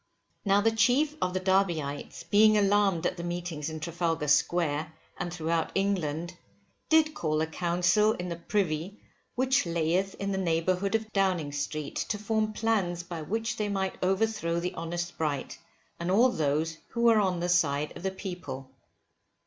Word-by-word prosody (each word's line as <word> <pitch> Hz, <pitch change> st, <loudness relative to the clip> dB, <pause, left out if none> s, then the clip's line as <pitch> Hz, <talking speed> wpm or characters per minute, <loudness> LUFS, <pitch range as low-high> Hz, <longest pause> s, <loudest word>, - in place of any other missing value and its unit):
Now 200 Hz, 0 st, +3 dB
the 225 Hz, +2 st, +3 dB
chief 250 Hz, +7 st, +3 dB
of 185 Hz, 0 st, 0 dB
the -, -, +1 dB
Derbyites 175 Hz, -7 st, 0 dB
being 210 Hz, +5 st, +5 dB
alarmed 200 Hz, -4 st, +3 dB
at -, -, 0 dB
the 170 Hz, -, -5 dB
meetings 175 Hz, -3 st, -4 dB
in 160 Hz, 0 st, -6 dB
Trafalgar 165 Hz, -1 st, -1 dB
Square 150 Hz, +2 st, +2 dB, 0.3 s
and 175 Hz, -1 st, -3 dB
throughout 165 Hz, -1 st, -1 dB
England, 175 Hz, -4 st, -1 dB, 0.5 s
did 315 Hz, -1 st, +4 dB
call 155 Hz, -, -1 dB
a 160 Hz, -, +2 dB
council 180 Hz, +6 st, +2 dB
in 180 Hz, -3 st, -5 dB
the 170 Hz, -, -3 dB
privy 175 Hz, +1 st, -2 dB, 0.4 s
which 260 Hz, -5 st, +2 dB
layeth 170 Hz, +4 st, 0 dB
in 200 Hz, 0 st, -3 dB
the 190 Hz, -, -1 dB
neighbourhood 185 Hz, +3 st, +1 dB
of 220 Hz, -1 st, -2 dB
Downing 185 Hz, -7 st, +1 dB
Street, 145 Hz, +1 st, -4 dB
to 210 Hz, -, 0 dB
form 215 Hz, 0 st, 0 dB
plans 200 Hz, -6 st, 0 dB
by 170 Hz, -2 st, -6 dB
which 225 Hz, +8 st, -2 dB
they 210 Hz, -1 st, -1 dB
might 195 Hz, -1 st, -2 dB
overthrow 190 Hz, -3 st, +1 dB
the 180 Hz, +1 st, -3 dB
honest 175 Hz, +1 st, -4 dB
Bright, 145 Hz, -4 st, -2 dB, 0.4 s
and 170 Hz, +1 st, -3 dB
all 230 Hz, +7 st, +5 dB
those 155 Hz, -, -1 dB
who 235 Hz, -, -4 dB
were 230 Hz, -2 st, +6 dB
on 185 Hz, -4 st, +1 dB
the 175 Hz, -, -1 dB
side 150 Hz, -4 st, +1 dB
of -, -, -8 dB
the 190 Hz, -, 0 dB
people. 175 Hz, -9 st, -7 dB
180 Hz, 165 wpm, -28 LUFS, 160-205 Hz, 0.5 s, were